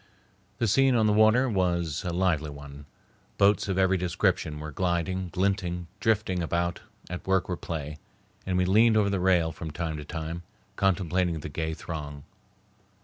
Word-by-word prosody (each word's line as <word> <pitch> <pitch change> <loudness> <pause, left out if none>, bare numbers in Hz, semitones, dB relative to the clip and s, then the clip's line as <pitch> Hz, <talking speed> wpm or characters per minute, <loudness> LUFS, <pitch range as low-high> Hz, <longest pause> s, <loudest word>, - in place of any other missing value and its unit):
The 115 - +1
scene 135 +4 +4
on 110 -2 +3
the 105 - +3
water 110 +5 +5
was 85 - 0
a 90 - -2
lively 85 -4 +1
one. 70 0 -10 0.5
Boats 100 +1 +3
of 95 -1 -1
every 95 0 +3
description 85 -3 0
were 75 0 -6
gliding, 90 +3 -1
glinting, 90 -2 -1
drifting 105 -5 +1
about 85 +1 -1 0.3
at 90 +2 -7
work 95 -1 +2
or 90 - -2
play, 75 -3 -6 0.4
and 95 -1 -1
we 90 - +2
leaned 110 +4 +5
over 100 -2 +2
the 100 - 0
rail 90 -3 +3
from 80 0 -7
time 80 0 -4
to 75 - -6
time, 80 +2 -5 0.3
contemplating 90 -3 +1
the - - -6
gay 80 +2 -3
throng. 75 -4 -7
90 Hz, 165 wpm, -27 LUFS, 80-95 Hz, 0.5 s, water